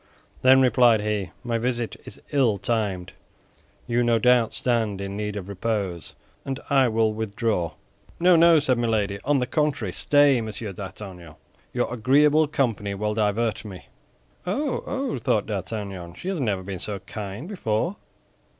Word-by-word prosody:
"Then," 130 +1 +6
replied 120 -3 +5
he, 105 -3 -2
"my 120 -2 -1
visit 120 -1 -2
is - - -10
ill 130 -8 +3
timed; 100 -4 -2 0.7
you, 120 0 +1
no 120 -1 +3
doubt, 120 0 +4
stand 115 -5 0
in 100 0 -5
need 105 0 -3
of 100 -2 -5
repose, 100 -4 -3 0.3
and 135 -1 -4
I 135 -2 +5
will 110 -1 +1
withdraw." 105 -5 -1 0.5
"No, 180 +1 +6
no!" 165 0 +7
said 130 -5 +2
Milady. 105 -4 0
"On 145 +1 +3
the 125 - +1
contrary, 135 - -1
stay, 145 -4 +4
Monsieur 110 -2 -6
d'Artagnan; 95 -4 -9 0.4
your - - -1
agreeable 145 +6 +4
company 115 -8 -1
will 105 +1 -1
divert 110 +1 0
me." 95 -4 -10 0.6
"Oh, 270 +9 -1
oh!" 270 - -2
thought 105 -2 +1
D'Artagnan. 95 -3 -5
"She 185 - -5
has 190 -4 -2
never 105 -8 -1
been 95 -1 -6
so 105 +2 -3
kind 105 - -7
before. 170 - -1
110 Hz, 150 wpm, -24 LUFS, 100-130 Hz, 0.7 s, no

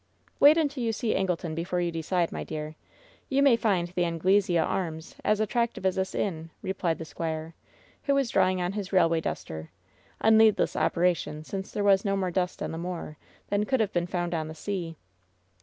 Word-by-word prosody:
"Wait 295 +3 +8
until 290 -5 0
you 225 - +1
see 225 0 -1
Angleton 180 -4 -1
before 175 +2 -2
you 175 -1 0
decide, 165 +1 -1
my - - -4
dear. 155 0 -6 0.5
You 275 +1 +3
may 275 -4 +6
find 195 -6 +1
the 180 0 -2
^Anglesea 175 +2 +2
Arms' 160 -4 -3
as 215 0 +2
attractive 235 -1 -1
as 190 - +3
this 190 0 -2
inn," 165 -4 -2
replied 185 -3 -1
the 165 - -6
squire, 160 0 -4 0.5
who 280 - +3
was 275 -4 +1
drawing 185 -1 +3
on 180 0 -1
his 200 -2 -5
railway 165 -4 +3
duster 80 - -5 0.3
— - - -33
a 220 - +4
needless 220 -1 +5
operation, 170 -3 0
since 190 +4 -6
there 205 - -2
was 195 -1 +4
no 195 -2 0
more 185 -2 -1
dust 180 0 -1
on - - -3
the 165 - -5
moor 170 -4 -5 0.3
than 205 0 +1
could 265 -2 +1
have 215 -3 0
been 175 0 0
found 175 -1 -2
on 160 -2 -2
the 155 - -8
sea. 170 -2 -4
180 Hz, 200 wpm, -27 LUFS, 165-205 Hz, 0.5 s, Wait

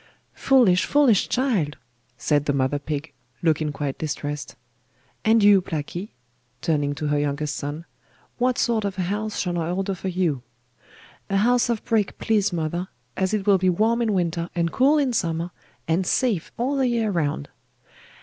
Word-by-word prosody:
'Foolish, 230 -9 +4
foolish 275 -9 +3
child!' 220 - 0 0.4
said 145 +4 +1
the 145 - +1
mother 135 +1 0
pig, 145 +1 -5 0.3
looking 155 -2 +1
quite 145 -1 -4
distressed. 145 -1 -4 0.7
'And 220 0 +4
you, 200 -2 +7
Blacky?' 175 +3 -5 0.5
turning 145 0 0
to 150 0 -3
her 145 0 +2
youngest 145 +1 -1
son, 150 +3 -5 0.5
'what 250 0 +2
sort 225 -2 +1
of 200 -2 -3
a 185 - 0
house 210 +3 -2
shall 175 -2 -1
I 165 0 -2
order 195 +2 -1
for 190 +1 -6
you?' 175 -7 0 0.9
'A 195 - +1
house 240 +4 +3
of 230 -3 -1
brick, 220 -4 0
please 205 -3 +1
mother, 170 +2 -2 0.3
as 190 -1 0
it 210 -2 -1
will 200 -2 +5
be 185 0 +3
warm 220 +6 +2
in 225 -2 +1
winter, 170 -2 -1
and 170 -1 0
cool 280 +4 +4
in 275 -4 +1
summer, 170 -3 -1 0.4
and 165 +4 +2
safe 230 - 0
all 265 +4 0
the 265 -1 +2
year 230 -3 +1
round. 145 - -1
180 Hz, 170 wpm, -24 LUFS, 155-220 Hz, 0.9 s, you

